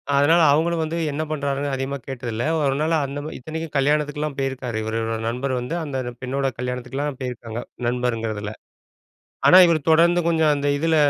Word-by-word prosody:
அதனால 160 +5 +5
அவங்களும் 165 +2 +2
வந்து 160 +2 -3
என்ன 155 +2 -2
பண்றாருன்னு 140 -1 -1
அதிகமா 135 +1 -3
கேட்டதில்ல. 120 -3 -4 0.2
ஒரு 135 -2 +1
நாள் 160 +1 +1
அந்த 140 +1 -5 0.2
இத்தனைக்கும் 160 +3 -6
கல்யாணத்துக்குலாம் 150 +1 0
போயிருக்காரு. 130 -4 -3
இவரோட 115 0 -2
நண்பர் 125 +3 -2
வந்து, 125 +7 -4
அந்த 140 -4 -4 0.2
பெண்ணோட 135 +2 -1
கல்யாணத்துக்குலாம் 125 +3 -3
போயிருக்காங்க. 120 -3 -5 0.3
நண்பர்ங்கிறதில, 115 -4 -2 1.0
ஆனா 185 - +9
இவர் 165 -2 +2
தொடர்ந்து 170 +2 +5
கொஞ்சம் 160 -2 +3
அந்த 145 0 -2
இதில 165 +1 +2
140 Hz, 145 wpm, -22 LUFS, 125-155 Hz, 1.0 s, ஆனா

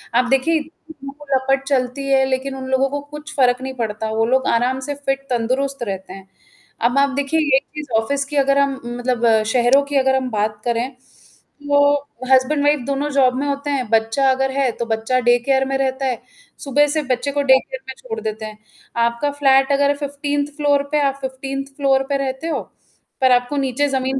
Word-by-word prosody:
आप 250 - +4
देखिए 270 +5 +2
इतनी 300 -2 -11 0.2
लपट 270 +1 +1
चलती 270 0 -1
है 265 -1 +4
लेकिन 265 +1 -2
उन 260 -1 -6
लोगों 265 +1 +2
को 285 +1 -3
कुछ 300 +1 -8
फ़र्क 250 -2 +3
नहीं 265 0 -5
पड़ता 220 -2 -3
वो 220 +1 +1
लोग 260 +3 +1
आराम 250 +3 +1
से - - 0
फिट 275 -1 -2
तंदुरुस्त 255 +3 -1
रहते 190 -3 -5
हैं। 195 0 -12 0.6
अब 245 +3 +2
आप 280 0 +4
देखिए 285 +3 0
यही 290 -4 +3 0.2
चीज़ 300 -1 -6
ऑफ़िस 280 +5 -1
की 290 +2 -7
अगर 275 0 +3
हम 280 -1 +2
मतलब 240 -2 +1
शहरों 250 +4 +4
की 285 0 -5
अगर 265 0 +3
हम 260 -1 -1
बात 210 0 -2
करें, 235 +1 0 0.8
तो 285 0 +3 0.3
हस्बैंड-वाइफ 290 +2 +3
दोनों 280 +2 -1
जॉब 265 -2 +3
में 285 - -1
होते 280 +1 -3
हैं, 265 -5 -1
बच्चा 225 +4 +2
अगर 265 0 0
है 270 -2 +1
तो 235 - -1
बच्चा 225 +3 0
डे 240 0 +4
केयर 265 +2 +1
में 270 0 -1
रहता 270 0 -1
है, 250 -3 -2 0.4
सुबह 290 +1 +2
से 310 +1 0
बच्चे 255 +3 0
को 285 - 0
डे 265 -1 +6
केयर 260 - -8
में 265 - -4
छोड़ 460 -2 -6
देते 220 0 -4
हैं 215 0 -9 0.5
आपका 235 +5 -1
फ्लैट 270 -1 +3
अगर 285 +1 +3
15th 285 0 -2
फ्लोर 285 -1 +2
पे, 300 -1 +2
आप 275 -1 +1
15th 270 +1 -4
फ्लोर 270 -2 +2
पे 280 - +1
रहते 270 +3 -3
हो? 330 - -1 0.6
पर 260 -1 +5
आपको 245 +3 +2
नीचे 275 +1 0
ज़मीन 265 0 -1
270 Hz, 200 wpm, -20 LUFS, 250-280 Hz, 0.8 s, डे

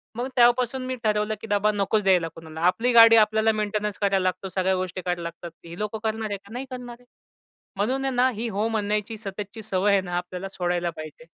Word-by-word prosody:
मग 245 +2 -2
तेव्हापासून 245 +1 +3
मी 255 - -3
ठरवलं 210 0 +1
की - - -8
बाबा 205 0 +2
नकोच 205 +1 0
द्यायला 180 -3 +3
कोणाला. 160 -1 -9
आपली 235 +7 +2
गाडी 230 -1 +9
आपल्याला 220 0 +4
मेंटेनन्स 210 -1 -2
करायला 195 -2 +1
लागतो 185 +1 -2
सगळ्या 190 0 +1
गोष्टी 185 0 -3
करायला 175 -1 -2
लागतात. 170 0 -7
ही 170 +1 -9
लोकं 210 +1 -3
करणार 220 0 -2
आहे 200 - -3
का? 200 +2 -19
नाही 255 +2 -4
करणार. 245 -1 -8 0.7
म्हणून 255 +7 0
आहे 270 - -1
ना 250 +1 +4
ही 230 +3 -3
हो 210 +2 -1
म्हणण्याची 210 0 -2
सततची 205 +1 -7
सवय 200 -1 +1
आहे 200 -1 +4
ना 175 -1 -4
आपल्याला 180 +2 -5
सोडायला 175 -2 -1
पाहिजे. 155 -1 -10
210 Hz, 205 wpm, -25 LUFS, 185-225 Hz, 0.7 s, गाडी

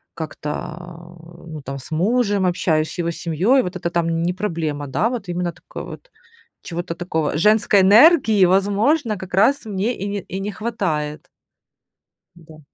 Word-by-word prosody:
как-то, 150 -2 -5 0.2
э, 170 -1 -13
ну, 155 -2 -8
там 135 +1 -5
с 130 - -11
мужем 200 +3 +1
общаюсь, 160 -3 0
с - - -9
его 170 0 0
семьей, 185 - +1
вот 180 +1 -5
это 170 -1 -3
там 165 -1 0
не 175 - +1
проблема. 160 -7 -3
Да, 215 - 0
вот 240 -6 -5
именно 175 0 -2
такой - - -10
вот, - - -11 0.5
чего-то 175 0 -5
такого, 160 -4 -2
женской 210 +1 +4
энергии, 220 - +6
возможно, 205 - +2
как 185 -1 -10
раз 225 +8 +3
мне 210 +3 -2
и 200 - -4
не 200 0 -3
и 190 - -6
не 200 +2 -3
хватает. 180 -9 -3 1.1
Да. 160 -2 -16
180 Hz, 160 wpm, -21 LUFS, 165-210 Hz, 1.1 s, энергии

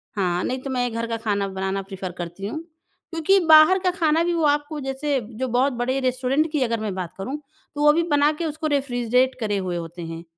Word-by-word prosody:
हाँ, 180 -3 0
नहीं 255 +1 -2
तो 275 - -6
मैं 245 -2 -1
घर 230 0 -2
का 230 0 -2
खाना 205 -3 -1
बनाना 190 0 -2
प्रेफ़र 190 -1 -6
करती 175 +3 -5
हूँ। 310 - -4 0.5
क्योंकि 330 +4 +3
बाहर 315 +4 +7
का 365 -1 +1
खाना 330 -2 +2
भी 345 0 0
वो 335 -1 0
आपको 295 +1 0
जैसे 270 +1 -1 0.2
जो 260 - 0
बहुत 255 +3 +2
बड़े 250 +2 -1
रेस्टोरेंट 260 +4 0
की 300 -3 0
अगर 230 -2 -1
मैं 215 -2 -3
बात 180 -3 -5
करूँ, 255 +10 -4 0.4
तो 290 - -3
वो 295 0 +6
भी 335 +2 +2
बना 290 +1 +4
के 340 - -1
उसको 310 0 -3
रेफ्रिजरेट 255 -3 +1
करे 210 -3 -1
हुए 185 -2 -2
होते 170 +1 -7
हैं। 165 0 -6
255 Hz, 225 wpm, -23 LUFS, 200-295 Hz, 0.5 s, बाहर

